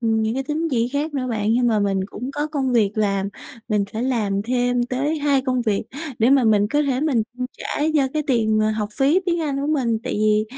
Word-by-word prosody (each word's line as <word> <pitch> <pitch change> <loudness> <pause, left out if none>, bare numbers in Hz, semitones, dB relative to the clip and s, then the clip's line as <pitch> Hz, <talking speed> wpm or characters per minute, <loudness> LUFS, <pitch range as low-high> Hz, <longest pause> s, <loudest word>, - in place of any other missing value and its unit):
những 220 -1 +1
cái 270 - -1
tín 310 +4 -2
chỉ 235 -2 +1
khác 290 +3 -2
nữa 260 -2 -1
bạn 215 -1 0
nhưng 245 +1 +2
mà 225 -3 +2
mình 195 -1 +1
cũng 250 +5 -6
có 295 +1 -2
công 280 -4 -1
việc 220 -5 +3
làm. 200 -2 +1 0.4
Mình 210 -2 +1
phải 225 - -3
làm 215 -6 0
thêm 245 +1 +1
tới 275 +6 -1
2 285 -2 +2
công 255 -2 0
việc 210 -3 0 0.4
để 230 +4 +4
mà 275 -3 +5
mình 210 -2 +4
có 295 +3 +2
thể 270 -3 0
mình 280 -7 +2
chi 250 +1 -4
trả - - -4
cho 275 -3 +3
cái 305 - +1
tiền, 220 -5 +2
à, 215 - +2
học 215 -1 -2
phí 285 +7 +4
tiếng 340 -1 +1
Anh 290 -4 -1
của 285 - -2
mình. 255 -7 +1
Tại 255 - -2
vì, 215 0 +2
245 Hz, 245 wpm, -22 LUFS, 220-280 Hz, 0.4 s, mà